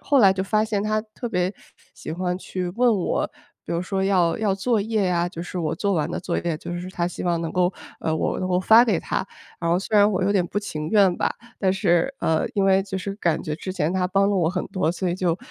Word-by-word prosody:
后 285 - +2
来 195 -6 +7
就 190 0 -2
发 215 +2 +2
现 210 -2 -1
她 215 0 0
特 225 +2 -7
别 180 -1 0 0.4
喜 - - -7
欢 180 +1 -2
去 185 -1 -4
问 235 +5 +2
我， 185 -4 0 0.4
比 - - -5
如 170 - 0
说 190 +1 -1
要 180 -4 +2
要 210 -3 +1
作 220 +4 +1
业 210 -2 0
啊， 175 -1 +1
就 170 -1 -7
是 180 - -6
我 165 -2 -1
做 200 +3 0
完 155 -4 0
的 - - -3
作 170 - -2
业， 170 -2 -2
就 170 - -7
是 180 +1 -6
她 175 -2 -1
希 180 - -6
望 170 -1 +1
能 165 -1 -3
够， 180 +1 +1 0.3
呃， 160 - 0
我 160 - -1
能 185 - -2
够 180 0 +2
发 225 +5 +7
给 210 -9 +1
她。 190 - -2 0.3
然 170 - -2
后 175 - +3
虽 210 +2 -1
然 205 0 +6
我 185 -1 0
有 195 - +2
点 190 -4 +2
不 205 - -2
情 155 -6 -5
愿 195 -4 +4
吧。 - - 0 0.2
但 190 -2 +2
是， 190 +5 +1
呃， 160 -1 +1
因 200 - +2
为 195 0 +4
就 190 -1 -4
是 195 +1 -4
感 170 -6 0
觉 150 -1 -3
之 185 +3 -5
前 170 -4 0
她 185 -1 +1
帮 195 +2 +2
了 200 - +1
我 170 -4 +2
很 180 0 -2
多， 170 -3 0
所 180 +1 -2
以 175 - 0
就， 180 -2 0
185 Hz, 285 characters per minute, -23 LUFS, 175-200 Hz, 0.4 s, 来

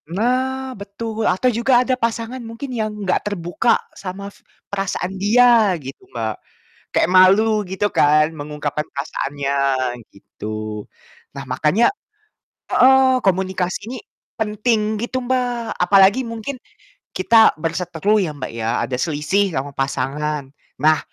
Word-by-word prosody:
Nah 260 +7 -1
betul, 220 +2 -3
atau 190 +8 +2
juga 245 +2 +3
ada 260 - +1
pasangan 230 0 -2
mungkin 230 +3 -7
yang 220 -2 -1 0.2
enggak 185 - +1
terbuka 175 -5 0 0.2
sama 200 +1 -8 0.3
perasaan 195 -2 -2
dia 225 -2 +5
gitu, 135 -3 -10
Mbak. 110 -2 -3 0.6
Kayak - - +2
malu 210 +4 +5
gitu 190 +2 -1
kan, 150 +2 +4
mengungkapkan 150 -1 -4
perasaannya 140 0 -3 0.6
gitu. 105 +1 -7 0.5
Nah 140 - -5
makanya 150 - +2 0.9
heeh, 260 0 +5
komunikasi 185 -1 0
ini - - -5 0.4
penting 215 +1 +1 0.2
gitu, 245 +2 -3
Mbak, 245 -2 -1
apalagi 195 +5 +5
mungkin 230 +4 -5 0.6
kita 220 +4 +5
berseteru 175 +5 0
ya, 175 -5 -1
Mbak, 140 - -5
ya 115 -1 -3 0.2
ada 125 - -3
selisih 160 +7 0
sama 140 +2 -3
pasangan. 140 +2 -2 0.3
Nah, 155 +1 +4
195 Hz, 120 wpm, -20 LUFS, 150-230 Hz, 0.9 s, dia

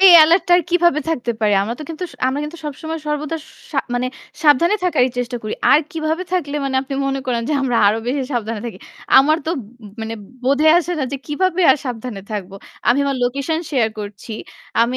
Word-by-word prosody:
এ 390 - +6 0.2
এলার্টটা 340 +3 +4
আর 355 - 0
কিভাবে 345 -3 +3
থাকতে 245 -6 -1
পারে? 210 -1 +3
আমরা 230 +4 -3
তো - - -4
কিন্তু 325 +3 -4
স - - -15
আমরা 270 +3 0
কিন্তু 315 +3 -7
সবসময় 315 +3 -5
সর্বদা 300 +2 -2 0.4
সা 275 - 0 0.2
মানে 245 +1 0 0.4
সাবধানে 315 +6 +5
থাকারই 260 -8 +3
চেষ্টা 245 0 -2
করি। 215 - -3 0.2
আর 295 - +7
কিভাবে 320 +1 -2
থাকলে 295 -5 -1
মানে 265 -1 -1
আপনি 275 0 -5
মনে 270 0 -1
করেন 235 -2 0
যে - - +1
আমরা 245 -3 +1
আরো 215 +2 +3
বেশি 270 +2 0
সাবধানে 225 -2 -2
থাকি? 200 -5 -7 0.4
আমার 305 +3 +5
তো - - +1 0.5
মানে 225 0 -4 0.3
বোধে 280 +4 +2
আসে 355 0 -2
না 270 - 0
যে - - -1
কিভাবে 370 +4 0
আর - - +5
সাবধানে 235 -4 -5
থাকবো। 195 -2 -5 0.3
আমি 245 +3 +5
আমার 275 -1 0
লোকেশন 275 +6 0
শেয়ার 245 -6 +2
করছি। 205 +1 -8 0.5
আমি 245 +2 0
275 Hz, 200 wpm, -19 LUFS, 240-315 Hz, 0.5 s, আর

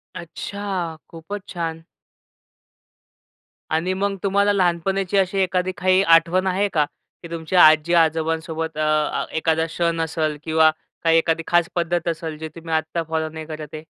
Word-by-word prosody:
अच्छा! 180 -1 -5
खूपच 190 +5 -8
छान. 165 -2 -4 1.9
आणि 165 +4 0
मग 195 +1 -1
तुम्हाला 200 +1 +2
लहानपणाची 190 +1 0
अशी 195 0 +1
एखादी 185 0 0
काही 185 +1 +3
आठवण 175 +3 +2
आहे 190 +2 +1
का, 150 -3 +3 0.4
की 170 - -8
तुमच्या 170 +2 +3
आजी-आजोबांसोबत 160 0 +1
अ, 155 0 +1
एखादा 160 0 +1
सण 170 -1 +1
असेल 160 -2 -1
किंवा 160 0 +4 0.3
काही 165 -1 +4
एखादी 165 0 +1
खास 175 -1 +2
पद्धत 175 0 -1
असेल, 165 -2 -3
जे 160 +1 -6
तुम्ही 165 -1 -6
आत्ता 160 +1 -1
फॉलो 160 -1 -1
नाही 160 0 -8
करत 155 -1 -7
आहे? 155 0 -7
165 Hz, 140 wpm, -22 LUFS, 160-185 Hz, 1.9 s, किंवा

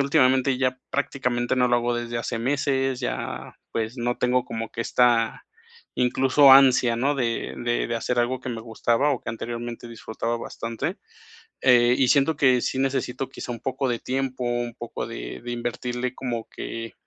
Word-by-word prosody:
últimamente 130 -2 +3
ya 130 -1 0
prácticamente 125 -3 -1
no 125 -1 +3
lo 120 - +4
hago 120 0 0
desde 120 0 -3
hace 115 0 -3
meses, 135 0 0
ya, 125 - -4 0.2
pues, 115 +3 -3
no 120 +1 -1
tengo 125 0 +1
como 115 -1 -5
que 115 - -5
esta, 115 -1 +2 0.5
incluso, 130 +2 +5
ansia, 130 -3 +6
¿no?, 140 +4 +1
de 120 -4 -2
de 120 0 0
de 120 - -2
hacer 120 +2 -1
algo 125 +2 +1
que - - -6
me 115 -2 -4
gustaba 115 +5 +1
o 130 - -1
que - - -8
anteriormente 120 +1 -6
disfrutaba 115 0 -4
bastante. 115 0 -4 0.7
Eh, 120 -1 +5
y 130 -2 +3
siento 145 +3 +3
que 130 -4 +4
sí 130 - -2
necesito 135 -1 -1
quizá - - -7
un 115 - -7
poco 135 0 -2
de 120 -1 0
tiempo, 130 -1 -3
un 120 -1 -2
poco 120 -2 -6
de - - -7
de 120 - -6
invertirle 120 +1 -3
como 120 -3 -4
que, 115 0 -6
120 Hz, 175 wpm, -24 LUFS, 120-130 Hz, 0.7 s, ansia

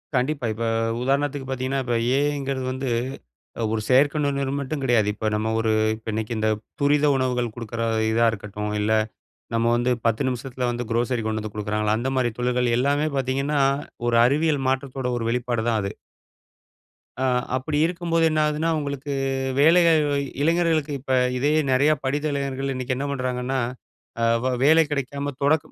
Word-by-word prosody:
கண்டிப்பா. 130 +1 0
இப்போ 115 +1 -3 0.3
உதாரணத்துக்கு 140 +1 0
பார்த்தீங்கன்னா, 130 +1 -1
இப்போ 120 -1 -1 0.2
ஏ 135 - +3
ஐ 145 - -3
ங்கிறது 135 -1 -3
வந்து, 130 0 -3 0.8
ஒரு 110 - -1
செயற்கை 140 +4 +4
நுண்ணறிவு 140 -1 -1
மட்டும் 140 +1 -4
கிடையாது. 120 -5 +3
இப்போ 110 +1 -3
நம்ம 110 +1 -1
ஒரு 115 -1 +1 0.2
இப்போ 110 0 -9
இன்னைக்கு 110 +2 -2
இந்த 110 0 +1 0.3
துரித 145 +1 +3
உணவுகள் 125 -3 0
குடுக்கிற 115 -1 -4 0.3
இதா 115 +1 +3
இருக்கட்டும். 105 0 -5
இல்ல 105 +1 0 0.6
நம்ம 115 0 +1
வந்து 120 +1 +1 0.2
10 115 -1 +1
நிமிசத்துல 125 0 -3
வந்து 120 0 -2
குரோசரி 120 +1 0
கொண்டு 110 0 -1
வந்து 105 -1 -7
கொடுக்குறாங்களா, 105 0 0
அந்த 130 - -1
மாதிரி 125 -3 +1
தொழில்கள் 125 -1 +1
எல்லாமே 145 +4 +1
பார்த்தீங்கன்னா, 135 +3 0 0.5
ஒரு 120 - +2
அறிவியல் 145 +1 +1
மாற்றத்தோட 130 -1 -2
ஒரு 115 - -3
வெளிப்பாடு 120 -1 -1
தான் 110 -2 +1
அது. 100 - -3 1.3
ஆ. - - 0 0.3
அப்படி 145 +3 -2
இருக்கும்போது 165 -1 0
என்ன 155 0 0
ஆகுதுனா, 150 +2 0
உங்களுக்கு 140 -1 -4 0.5
வேலைகள 165 +1 +6 0.5
இளைஞர்களுக்கு, 165 -1 +2
இப்ப 130 0 -3 0.2
இதே 145 +4 +1 0.2
நிறைய 140 +4 +4
படித்த 145 +3 -1
இளைஞர்கள் 135 -1 -2
இன்னைக்கு 130 0 -2
என்ன 140 - -2
பண்ணுறாங்கன்னா, 130 0 -2 0.6
அ - - +1 0.2
வே 130 - +2
வேலை 160 +3 +6
கிடைக்காம 140 0 -2
தொடக்க 145 +2 +2
130 Hz, 160 wpm, -24 LUFS, 120-145 Hz, 1.3 s, வேலைகள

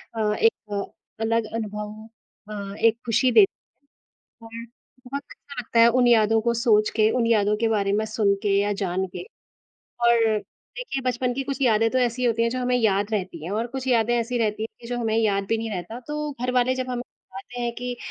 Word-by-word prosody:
अ, - - -4 0.2
एक 210 -2 -1 0.3
अलग 225 0 +1
अनुभव 210 -1 -4 0.6
हाँ 200 -1 -6
एक 230 0 +3
खुशी 245 +2 +2
देत 400 - +7 1.1
हैं। 230 0 -7 0.4
बहुत 280 +3 -5
अच्छा 280 -3 -10
लगता 230 0 0
है 230 - +8
उन 245 - +4
यादों 225 -2 +4
को 235 +1 +1
सोच 225 -3 +3
के, 215 -1 +4
उन 245 -2 +1
यादों 210 -2 +3
के 225 +1 +1
बारे 200 -3 +1
में 215 +1 +1
सुन 215 -2 +1
के 200 -1 +2
या 205 +1 +1
जान 190 0 -1
के। - - -5 0.8
और 235 0 +5 0.6
देखिए - - -4
बचपन 250 0 0
की 270 +2 -3
कुछ 275 0 -5
यादें 225 -3 +3
तो, 260 - +1
ऐसी 245 0 0
होती 230 -1 +1
हैं 230 - +2
जो 255 +2 -3
हमें 250 0 +1
याद 205 -2 +1
रहती 185 -6 -3
हैं 175 - -5
और 225 +3 -1
कुछ 265 +1 -6
यादें 240 -1 +2
ऐसी 240 +2 -2
रहती 215 -2 -1
हैं 225 - -4
कि, 235 - -10
जो 245 0 -3
हमें 225 -2 0
याद 200 -3 +1
भी 225 - +2
नहीं 225 0 -4
रहता 195 +5 -5
तो 300 0 -3
घर 250 0 0
वाले 250 +1 +2
जब 255 0 -3
हमें 245 -1 -2
बताते 245 +1 -11
हैं 240 0 -1
कि 245 +1 -4
230 Hz, 210 wpm, -24 LUFS, 210-245 Hz, 1.1 s, है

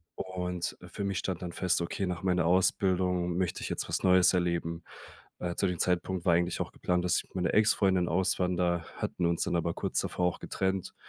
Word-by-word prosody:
Und, 90 -2 -4
äh, - - -11
für - - -5
mich 100 -2 -1
stand 95 -3 -3
dann 90 -1 -4
fest: 90 -1 +1
„Okay, 85 +3 -2
nach 90 -1 -4
meiner 90 -3 +2
Ausbildung 90 0 +2
möchte 90 -1 -1
ich - - -3
jetzt - - -3
was - - -1
Neues 95 0 +5
erleben.“ 85 -2 -1 0.6
Äh, 85 -1 -3
zu 100 - +1
dem 90 -2 -3
Zeitpunkt 90 0 0
war 90 - +5
eigentlich 85 0 +1
auch - - -4
geplant, 90 -1 -1
dass 90 - +2
ich - - -1
mit - - -26
meiner 90 -2 0
Ex-Freundin 95 -4 +3
auswander, 90 -1 +1
hatten 90 - -2
uns 85 0 +1
dann 85 - 0
aber 85 0 -1
kurz - - -2
davor 90 - -1
auch 90 - -3
getrennt, 95 -1 -2
90 Hz, 210 wpm, -30 LUFS, 85-95 Hz, 0.6 s, Neues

